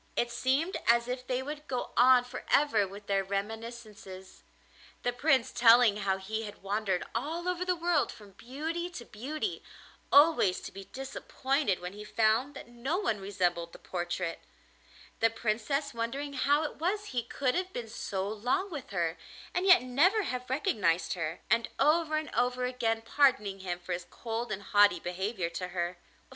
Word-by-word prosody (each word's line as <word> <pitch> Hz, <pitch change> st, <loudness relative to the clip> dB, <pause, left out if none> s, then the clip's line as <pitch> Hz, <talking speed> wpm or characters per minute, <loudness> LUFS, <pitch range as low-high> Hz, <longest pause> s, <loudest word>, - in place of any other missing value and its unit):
It 240 Hz, 0 st, 0 dB
seemed 270 Hz, +10 st, 0 dB
as 235 Hz, +1 st, +4 dB
if 250 Hz, 0 st, -4 dB
they 255 Hz, 0 st, -1 dB
would 295 Hz, +2 st, -7 dB
go 250 Hz, -2 st, -3 dB
on 250 Hz, 0 st, +6 dB
for 250 Hz, +1 st, -8 dB
ever 225 Hz, -9 st, +4 dB
with 200 Hz, +2 st, -11 dB
their 195 Hz, -1 st, +1 dB
reminiscences, 210 Hz, -1 st, -6 dB, 0.6 s
the 245 Hz, -, 0 dB
Prince 260 Hz, -1 st, +2 dB
telling 230 Hz, -2 st, +6 dB
how 195 Hz, -2 st, 0 dB
he 215 Hz, +3 st, -4 dB
had 205 Hz, -1 st, -10 dB
wandered 195 Hz, -2 st, -1 dB
all 320 Hz, +9 st, -3 dB
over 360 Hz, 0 st, 0 dB
the 365 Hz, 0 st, +1 dB
world 340 Hz, -3 st, +1 dB
from 205 Hz, -2 st, -14 dB
beauty 310 Hz, -, -4 dB
to 250 Hz, -9 st, -9 dB
beauty, 305 Hz, -, -4 dB, 0.5 s
always 285 Hz, -, +5 dB
to -, -, -8 dB
be 195 Hz, 0 st, -9 dB
disappointed 270 Hz, -3 st, -2 dB
when 180 Hz, +1 st, -6 dB
he 210 Hz, +1 st, -8 dB
found 225 Hz, +6 st, +1 dB
that -, -, -9 dB
no 240 Hz, +8 st, -2 dB
one 225 Hz, -, 0 dB
resembled 175 Hz, -4 st, -1 dB
the -, -, -10 dB
portrait; 175 Hz, -1 st, -3 dB, 0.8 s
the 225 Hz, -, +4 dB
Princess 230 Hz, +6 st, -1 dB
wondering 270 Hz, +5 st, -3 dB
how 290 Hz, +2 st, +2 dB
it 305 Hz, -, -4 dB
was 410 Hz, +6 st, -1 dB
he 245 Hz, -, +1 dB
could 250 Hz, +2 st, -1 dB
have 370 Hz, +1 st, -2 dB
been 240 Hz, -7 st, -5 dB
so 195 Hz, -3 st, -3 dB
long 245 Hz, -, -1 dB
with 280 Hz, -4 st, -6 dB
her 170 Hz, -3 st, -1 dB, 0.3 s
and 360 Hz, +2 st, 0 dB
yet 370 Hz, -7 st, +8 dB
never 340 Hz, -, +3 dB
have 250 Hz, -6 st, -4 dB
recognised 195 Hz, -, +1 dB
her, 165 Hz, -2 st, -4 dB
and 230 Hz, +1 st, +2 dB
over 310 Hz, +2 st, +3 dB
and 310 Hz, 0 st, -4 dB
over 250 Hz, 0 st, +1 dB
again 230 Hz, -3 st, -1 dB
pardoning 225 Hz, -7 st, +2 dB
him 180 Hz, -2 st, -3 dB
for 180 Hz, +1 st, -4 dB
his 175 Hz, 0 st, -5 dB
cold 230 Hz, 0 st, -4 dB
and 200 Hz, -1 st, -4 dB
haughty 205 Hz, -3 st, +5 dB
behaviour 185 Hz, +2 st, -2 dB
to 180 Hz, +2 st, -4 dB
her. 175 Hz, 0 st, -3 dB
235 Hz, 175 wpm, -30 LUFS, 200-280 Hz, 0.8 s, yet